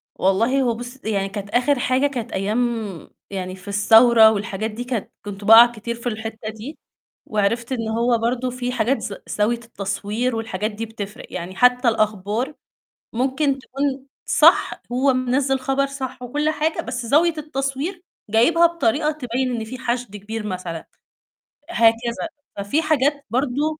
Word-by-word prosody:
والله 230 +8 +2
هو 240 -3 +1
بُصّي، 245 0 -7
يعني 195 -2 0
كانت 200 0 -6
آخر 255 +4 +2
حاجة 255 +3 +2
كانت 250 -5 -4
أيام 200 +4 -1 0.7
يعني 185 -1 -5
في 190 +2 -13
الثورة 220 +2 +6
والحاجات 210 0 -3
دي 230 +3 -6
كانت 245 -4 -3
كنت 205 0 -7
بقع 225 +3 +9
كتير 235 0 -5
في 235 +1 -5
الحتّة 220 -1 -5
دي 220 +8 -9 0.5
وعرفت 230 +4 0
إن 230 -3 -2
هو 235 +2 +1
برضه 245 +2 -1
في 250 0 -3
حاجات 250 +3 +1
ز 200 - -5
زاوية 220 +3 0
التصوير 215 +3 -3
والحاجات 215 -2 -3
دي 225 +2 -5
بتفرِق، 210 -2 -8
يعني 180 +2 -6
حتّى 250 +1 +4
الأخبار 215 +4 0 0.6
ممكن 270 +3 0
تكون 275 0 -3 0.2
صح - - +4
هو 265 +2 +3
منزِّل 260 +1 +1
خبر 270 +1 +1
صح 260 -2 -6
وكلّ 295 +5 -1
حاجة 310 +1 -1
بس 245 -2 -5
زاوية 320 +6 +3
التصوير 290 +4 -3 0.3
جايبها 320 +11 +5
بطريقة 305 -3 +1
تبيّن 255 -3 -2
إن 225 - -4
في 250 +4 -8
حشد 245 -4 -3
كبير 210 +2 -6
مثلًا، 180 -4 -5 0.8
هكذا 230 -9 +5 0.6
ففي 205 +11 0
حاجات 290 -2 +1
برضه 285 +6 -1
240 Hz, 150 wpm, -22 LUFS, 215-270 Hz, 0.8 s, بقع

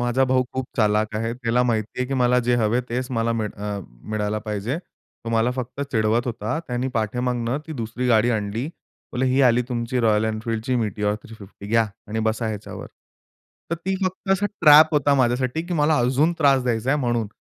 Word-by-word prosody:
माझा 120 +2 +2
भाऊ 130 0 +2
खूप 130 -1 -3
चालाख 105 -1 +2
आहे. 115 +1 -2
त्याला 125 0 +1
माहिती 110 -3 -1
आहे 125 - 0
की 135 - -1
मला 125 -1 +3
जे 120 - +4
हवे 110 0 +1
आहे, 125 - -3
तेच 125 +2 -2
मला 115 -1 0
मिळ 110 -2 -1
अ, 105 0 -4 0.3
मिळायला 105 0 -1
पाहिजे. 105 +6 -3
तो 115 -9 -13
मला 115 +1 +2
फक्त 130 +2 -5
चिडवत 110 +2 +1
होता. 115 +4 -2
त्याने 125 +1 -1
पाठीमागनं 120 +3 -1
ती 160 - -6
दुसरी 115 +3 -3
गाडी 115 0 +4
आणली. 110 +2 -2 0.5
बोलले, 130 +2 0
"ही 130 +2 +2
आली 125 -1 +4
तुमची 120 0 -2
Royal 110 -2 +3
Enfieldची 115 +3 -2
Meteor 105 -1 -1
350 100 -2 -12
घ्या' 115 +1 +3 0.2
आणि 110 +1 -2
बसा 110 +1 0
ह्याच्यावर." 105 -2 -6 0.8
तर - - +1
ती 185 +4 -3
फक्त 185 +1 -3
असा 195 +2 +1
ट्रॅप 155 -5 +6
होता 145 -1 +3
माझ्यासाठी, 130 +3 +1
की 175 +1 -4
मला 150 0 +3
अजून 135 +7 +2
त्रास 140 -3 +4
द्यायचा 120 0 0
आहे 145 - +2
म्हणून. 120 -3 0
120 Hz, 195 wpm, -23 LUFS, 110-130 Hz, 0.8 s, ट्रॅप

